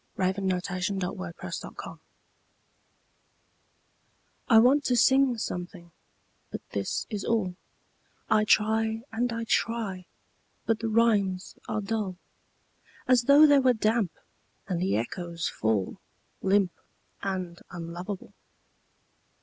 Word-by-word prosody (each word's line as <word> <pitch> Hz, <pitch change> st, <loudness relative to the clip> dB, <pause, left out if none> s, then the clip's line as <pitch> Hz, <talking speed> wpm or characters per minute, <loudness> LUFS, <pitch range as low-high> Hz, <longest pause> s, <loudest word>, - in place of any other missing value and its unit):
A 185 Hz, 0 st, +2 dB
SCRAWL 185 Hz, -1 st, -4 dB, 2.5 s
I 225 Hz, -, +7 dB
want 260 Hz, +6 st, +6 dB
to 250 Hz, -, +2 dB
sing 265 Hz, 0 st, +4 dB
something 180 Hz, -3 st, -5 dB, 0.6 s
but -, -, -8 dB
this 100 Hz, -1 st, -2 dB
is 210 Hz, -2 st, -3 dB
all 205 Hz, -6 st, 0 dB, 0.7 s
I 215 Hz, -1 st, +4 dB
try 220 Hz, +1 st, +2 dB
and 240 Hz, +2 st, -1 dB
I 230 Hz, 0 st, -3 dB
try, 220 Hz, -5 st, -1 dB, 0.6 s
but 225 Hz, -1 st, +1 dB
the 230 Hz, -, -2 dB
rhymes 205 Hz, -5 st, +2 dB
are 215 Hz, -, -1 dB
dull 205 Hz, -3 st, -2 dB, 0.9 s
As 250 Hz, -2 st, +4 dB
though 285 Hz, +3 st, +8 dB
they 290 Hz, -2 st, +6 dB
were 260 Hz, -1 st, +4 dB
damp, 220 Hz, -4 st, +1 dB, 0.5 s
and 180 Hz, -3 st, -2 dB
the 190 Hz, +1 st, +1 dB
echoes 170 Hz, -, -3 dB
fall 110 Hz, -4 st, -1 dB, 0.4 s
Limp 195 Hz, -1 st, +3 dB, 0.5 s
and 185 Hz, -3 st, -3 dB
unlovable. 175 Hz, +3 st, -7 dB
200 Hz, 100 wpm, -28 LUFS, 180-230 Hz, 2.5 s, though